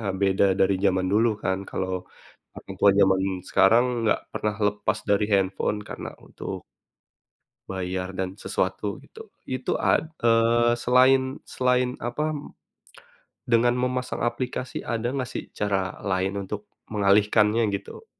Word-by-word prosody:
eee, 100 -4 -2
beda 95 0 +3 0.2
dari 95 +1 +4
zaman 95 -1 +2
dulu 115 +3 +4
kan. 95 0 0
Kalau 95 0 -2 0.6
orang 95 - -9
tua 100 - +7
zaman 95 -1 +4 0.3
sekarang 115 +6 +5 0.2
nggak 110 - +2
pernah 105 -1 -2
lepas 105 +1 -1
dari 100 0 +3
handphone 95 +2 +1
karena - - -6 0.2
untuk - - -7 1.0
bayar 95 0 -4
dan 95 +1 -4
sesuatu, 95 +2 -2
gitu. 445 0 -13 0.2
Itu 130 0 -2
ad 160 - +2 0.2
eee, 115 +1 +4
selain 130 +2 +4
selain 125 0 0
apa, 150 +6 -2 1.1
dengan 120 +1 +3
memasang 125 0 -2
aplikasi 125 +1 -3
ada 120 +1 -2
gak 130 -3 -2
sih - - -5
cara 95 -3 -2
lain 95 0 -1
untuk 105 +1 -7 0.2
mengalihkannya 105 +2 +3
gitu? 100 - -6
105 Hz, 130 wpm, -25 LUFS, 95-125 Hz, 1.1 s, tua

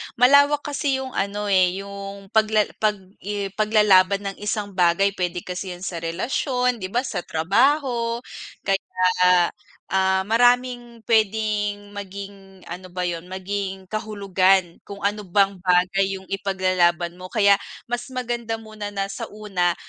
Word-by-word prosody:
Malawak 285 +4 +5
kasi 285 -1 -1
yung 260 - -7
ano, 205 +1 -2
eh, 185 0 +3
yung 200 0 -9
pagla 215 -1 +3 0.2
pag 215 -1 +2 0.2
i 200 0 -4
paglalaban 200 -2 +3
ng - - -16
isang 210 -1 -3
bagay. 185 +1 +3
P'wede 180 -2 -3
kasi 180 0 -5
yun 175 - -12
sa 175 -3 -4
relasyon, 250 - -1
'di 185 - -4
ba 235 +6 -1
sa 210 -8 -3
trabaho. 235 - +1 0.5
Kaya, 190 -1 -1 0.9
ah, 190 0 +2
maraming 245 +1 +1
p'wedeng 210 -2 0
maging, 195 -1 -9
ano 180 +2 -8
ba 180 0 -4
yun? 175 -1 -3
Maging 190 0 -5
kahulugan 195 -4 +1
kung 200 0 -9
ano 205 0 -1
bang 195 +1 +2
bagay 185 +2 +2
yung 190 - -9
ipaglalaban 185 -3 +1
mo. 185 - -7
Kaya 200 -1 +4 0.3
mas 245 0 -2
maganda 240 -3 -3
muna 215 -2 -8
na 200 -1 -3
sa - - -6
una, 190 -5 -1
200 Hz, 140 wpm, -23 LUFS, 185-220 Hz, 0.9 s, Malawak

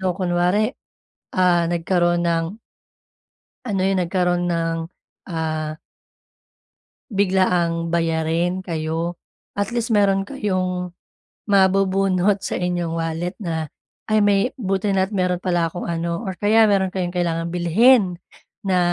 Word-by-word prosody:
ano 190 - -2
kunwari, 185 +5 +1 0.6
ah, 175 -2 +4
nagkaroon 175 0 +1
ng 170 +5 -1 1.1
ano 200 -4 -1
'yon 195 - +1
nagkaroon 175 0 0
ng, 165 0 -1 0.5
ah 155 -1 -3 1.3
biglaang 180 -4 +1
bayarin 165 +2 0
kayo 165 0 -3 0.3
at 200 0 -2
least 235 -1 -1
mayro'n 195 -1 +3
kayong 185 -7 -2 0.6
mabubunot 195 0 +3
sa - - -2
inyong 175 -2 -1
wallet 165 +2 -3
na, 160 -6 -3 0.4
"ay, 215 - +4
may 200 -1 +4 0.2
buti 195 -1 -1
na't 190 +2 +1
mayro'n 180 -1 +1
pala 175 -2 0
akong 175 - -6
ano" 170 0 -2
or 190 - -2
kaya 220 +2 +4
mayro'n 195 -2 +2
kayong 180 -1 -3
kailangan 165 -1 -1
bilhin 185 +2 +4 0.5
na 185 -1 +2
180 Hz, 115 wpm, -21 LUFS, 170-195 Hz, 1.3 s, ah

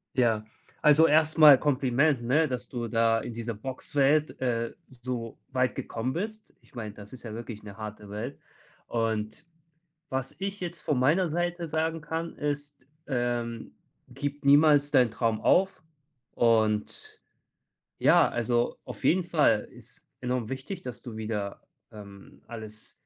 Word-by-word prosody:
Ja, 115 -4 +2 0.4
also 150 +2 +7
erst 155 +1 +3
mal 150 -4 +10
Kompliment, 140 0 +2
ne, 145 +7 +2
dass 125 -2 -4
du 120 -2 -4
da 115 0 +2
in 120 - -6
dieser 115 0 -4
Boxwelt, 135 +5 0
äh, 115 -2 -1 0.2
so 120 -2 -6
weit 130 -1 +1
gekommen 120 +3 -3
bist. 215 +5 -5
Ich - - -25
meine, 110 -3 -5
das 105 +1 -12
ist 130 - -10
ja 110 -3 -7
wirklich 115 -1 -7
'ne 100 -1 -10
harte 105 -1 -8
Welt. 110 +7 -5 0.5
Und, 110 +4 -2 0.6
was 130 0 -3
ich 200 +1 -3
jetzt 175 -2 -5
von 150 -4 0
meiner 160 +8 +3
Seite 175 +1 -2
sagen 160 +1 -1
kann, 160 +2 -4
ist, 145 -2 -4 0.2
ähm, 120 -3 -2 0.4
gib 145 +3 -5
niemals 145 0 +6
deinen 125 -3 +5
Traum 115 -1 0
auf. 190 +1 +2 0.5
Und, 110 -2 +1 0.8
ja, - - +5
also 120 0 0
auf - - -9
jeden 180 +1 +3
Fall 150 -11 +2
ist - - -10
enorm 125 -2 -2
wichtig, 135 +8 -5
dass 125 -5 -7
du 120 -4 -8
wieder, 105 -2 -4 0.3
ähm, 100 -2 -13
alles 110 -2 -8
125 Hz, 145 wpm, -28 LUFS, 115-150 Hz, 0.8 s, mal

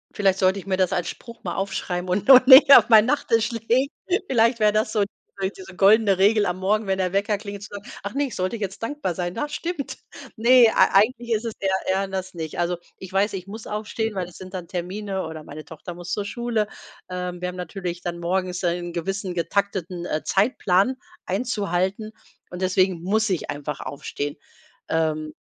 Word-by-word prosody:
Vielleicht 195 -2 +2
sollte 190 +1 +3
ich - - -11
mir 190 -1 -1
das 185 -2 +1
als 175 - -1
Spruch 235 -1 -11
mal - - -4
aufschreiben 185 -2 -3
und 190 +7 -1
noch 255 -1 +9
näher 275 +1 +10
auf - - -4
mein 220 -2 +7
Nachtisch 235 -4 +1
legen. 235 +4 +1 0.4
Vielleicht 230 -1 +3
wäre 210 0 +5
das 215 0 0
so 210 -2 +2 0.5
diese 190 0 -11
goldene 200 0 +5
Regel 205 +2 +4
am 180 +1 -2
Morgen, 210 +2 0
wenn 190 - 0
der 185 -1 0
Wecker 200 +2 +1
klingelt, 200 -1 -8
zu 210 - -8
sagen: 205 - -7 0.2
„Ach, 200 - -5
ne, 285 +1 0
ich 255 - -8
sollte 185 +4 -1
jetzt 200 -3 -5
dankbar 230 -6 -3
sein. 175 +1 -4
Das 295 0 -3
stimmt.” 335 -4 -4 0.4
Ne, 240 +1 +6
ei - - +5
eigentlich 235 +3 +3
ist 215 0 -1
es 230 - -3
der 195 - +1 0.2
ja, 195 +1 0
das 190 -1 -5
nicht. 160 -3 -6
Also, 175 0 0 0.2
ich 190 - -10
weiß, 200 +2 +1
ich 185 -2 -5
muss 215 +2 -9
aufstehen, 210 +1 -3
weil 185 -2 -2
es 180 - -15
sind 185 0 -11
dann 180 -3 -6
Termine 190 +2 -4
oder 160 -1 -8
meine 150 +1 -10
Tochter 160 +2 -9
muss 175 +1 -6
zur 205 - -1
Schule. 230 0 -2 0.4
Ähm, 180 -1 -5
wir 180 - -2
haben 180 - -8
natürlich 180 0 -5
dann 175 -1 -4
morgens 180 +1 -2
einen 175 0 -1
gewissen 190 +2 -3
getakteten, 180 -1 -2
äh, 155 - -2
Zeitplan 200 +1 +2 0.3
einzuhalten 200 -1 -1 0.4
und 180 +1 -8
deswegen 185 -2 +1
muss 215 +3 +1
ich 180 -5 -2
einfach 145 0 -5
aufstehen. 145 +1 -5 0.5
Ähm, 155 -1 -1
195 Hz, 200 wpm, -23 LUFS, 180-215 Hz, 0.5 s, näher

